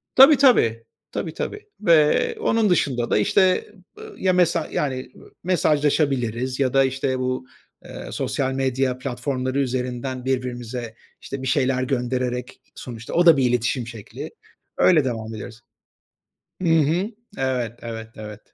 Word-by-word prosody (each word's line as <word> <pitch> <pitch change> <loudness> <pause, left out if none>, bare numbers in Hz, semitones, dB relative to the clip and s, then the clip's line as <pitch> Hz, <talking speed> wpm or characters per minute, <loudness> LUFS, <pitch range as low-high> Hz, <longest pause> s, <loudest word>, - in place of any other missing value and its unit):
Tabii, 270 +3 +9
tabii. 115 - +4 0.3
Tabii, 160 - -4
tabii 425 - -5
ve 160 -6 +4
onun 220 -2 +2
dışında 130 -9 +1
da - - +4
işte, 185 - +3 0.3
ııı, 435 -1 -10
ya 185 -1 +2
mesaj 170 -3 +1
yani, 130 -3 -2
ııı, - - -16
mesajlaşabiliriz 140 -7 +1
ya 130 -3 +1
da 135 0 +5
işte 130 0 -1
bu, 130 0 -2 0.4
ııı, - - -8
sosyal 135 -1 -1
medya 130 -1 0
platformları 130 +1 -2
üzerinden 125 0 -3
birbirimize 125 -3 -3 0.3
işte 135 -1 -6
bir 130 - -4
şeyler 130 -1 +1
gönderereki 125 -1 -2 0.2
sonuçta 120 -2 -8
o 175 - +3
da 165 -3 +8
bir 135 - +2
iletişim 120 0 0
şekli. 115 -4 -8 0.5
Öyle 160 -5 +5
devam 115 -2 -4
ediyoruz. 110 +2 -9 1.0
Hı 175 - +1
hı. 165 +3 +3 0.3
Evet, 125 -4 -1
evet, 115 -1 -6
evet. 105 -1 -8
130 Hz, 140 wpm, -23 LUFS, 125-150 Hz, 1.0 s, Tabii